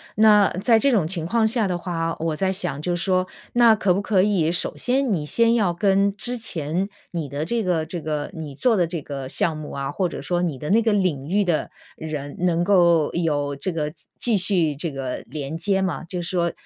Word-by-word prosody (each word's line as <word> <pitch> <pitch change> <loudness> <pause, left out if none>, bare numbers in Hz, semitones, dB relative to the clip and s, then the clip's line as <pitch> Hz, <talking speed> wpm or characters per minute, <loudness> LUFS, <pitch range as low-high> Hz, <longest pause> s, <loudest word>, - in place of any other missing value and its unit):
那 210 -2 +6
在 225 -1 +5
这 275 +4 +3
种 200 -10 +2
情 170 -1 -3
况 220 +6 +2
下 220 -2 +1
的 180 -2 -1
话， 165 -2 -3
我 160 -1 -1
在 190 +4 0
想 185 -7 -2
就 175 +2 -1
说， 185 +1 +1 0.3
那 235 -2 +6
可 195 -3 +2
不 195 - -1
可 200 -2 +2
以， 185 -6 +2
首 175 - -1
先 255 -2 0
你 160 -5 -1
先 230 +9 +3
要 210 -6 +2
跟 195 +2 +2
之 245 +5 -2
前 185 -4 -3 0.2
你 165 -5 -4
的 145 +3 -3
这 230 +6 -1
个 175 -4 0
这 175 +1 -6
个， 150 0 -3
你 155 -5 -7
做 235 - +2
的 175 -4 +2
这 165 -3 -5
个 135 -2 -6
项 160 +3 0
目 155 -1 -7
啊， 140 0 -4
或 180 +3 -1
者 - - -7
说 175 -1 -1
你 165 -6 -2
的 150 +5 -4
那 225 +3 +5
个 225 -1 +1
领 175 -9 0
域 205 +3 +2
的 175 -5 -1 0.3
人， 150 -3 -6
能 175 -1 +1
够 170 -5 +4
有 145 -4 -1
这 140 +7 -1
个 150 -2 -3 0.2
继 235 -3 +2
续 180 -6 +3
这 165 +4 -3
个 135 -2 -4
连 145 +2 -5
接 190 +4 0
吗？ 185 -3 -2
就 180 +1 -5
是 - - -3
说， 170 -2 0
175 Hz, 240 characters per minute, -23 LUFS, 155-200 Hz, 0.3 s, 那